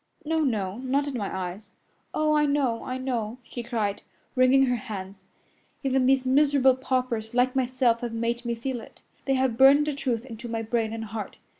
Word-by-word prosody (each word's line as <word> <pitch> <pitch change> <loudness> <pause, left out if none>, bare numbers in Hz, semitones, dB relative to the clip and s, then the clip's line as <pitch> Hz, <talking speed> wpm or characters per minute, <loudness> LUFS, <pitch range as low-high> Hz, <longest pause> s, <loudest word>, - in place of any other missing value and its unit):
"No, 320 +1 +1
no! 215 -8 -1
Not 270 +3 0
in 285 - -3
my 205 -5 -3
eyes." 190 +3 -5 0.4
"Oh, 305 0 +1
I 300 -1 +3
know, 275 -5 0
I 255 - -4
know!" 245 -3 -3
she 240 - -7
cried, 225 -4 -2 0.3
wringing 260 +1 +5
her 250 -1 +1
hands. 195 -5 -7 0.6
"Even 265 -1 +2
these 265 -1 +3
miserable 270 -1 +4
paupers 250 -4 -2
like 250 +1 +2
myself 255 -2 +2
have 240 -1 -4
made 235 +1 -2
me 235 -1 -2
feel 245 +1 -4
it. - - -16 0.2
They 270 - +2
have 260 -3 0
burned 275 +2 +7
the 300 - -1
truth 250 -4 -2
into 235 -1 -8
my 225 0 -2
brain 225 0 -1
and 225 0 -4
heart. 215 -1 -6
250 Hz, 190 wpm, -26 LUFS, 225-265 Hz, 0.6 s, burned